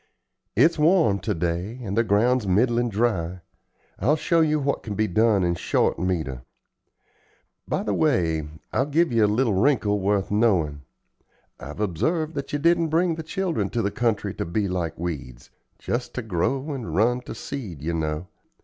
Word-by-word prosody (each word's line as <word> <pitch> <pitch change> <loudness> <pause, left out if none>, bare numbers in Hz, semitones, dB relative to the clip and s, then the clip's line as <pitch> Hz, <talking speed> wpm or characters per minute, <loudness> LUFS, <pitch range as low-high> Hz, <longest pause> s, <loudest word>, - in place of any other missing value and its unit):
It's 165 0 +4
warm 155 - +4
to - - -2
day, 90 +8 -2
and 100 -3 -3
the 115 - +3
ground's 115 +2 +2
middlin' 120 +5 +2
dry. 95 -6 -1 0.6
I'll 150 - +3
show 165 +1 +2
you 155 -1 +2
what 140 0 -1
can 105 -2 -5
be 110 +2 +1
done 105 0 +3
in 85 -1 +1
short 85 - 0
metre. 80 -8 -2 1.3
By - - -1
the - - -1
way, 85 - +1 0.3
I'll 135 - +1
give 165 +2 +2
you 115 -2 +3
a - - +5
little 110 +2 +1
wrinkle 105 -1 +2
worth 100 0 0
knowin'. 90 -10 +2 0.8
I've 75 +8 -8
observed 155 - -1
that 140 -2 -5
you 145 - 0
didn't 170 +2 +3
bring 165 +2 +2
the 160 - -5
children 165 - -2
to 115 - -1
the 100 - 0
country 105 -4 -1
to - - -3
be 100 +5 -1
like 85 -3 -3
weeds 70 -8 -6 0.3
just 125 +1 -3
ter 125 - -3
grow 130 - -1
and 130 -5 -5
run 120 +5 +2
ter - - -8
seed, 100 - -7
ye 85 +2 -1
know. 80 0 -2
105 Hz, 175 wpm, -24 LUFS, 90-135 Hz, 1.3 s, a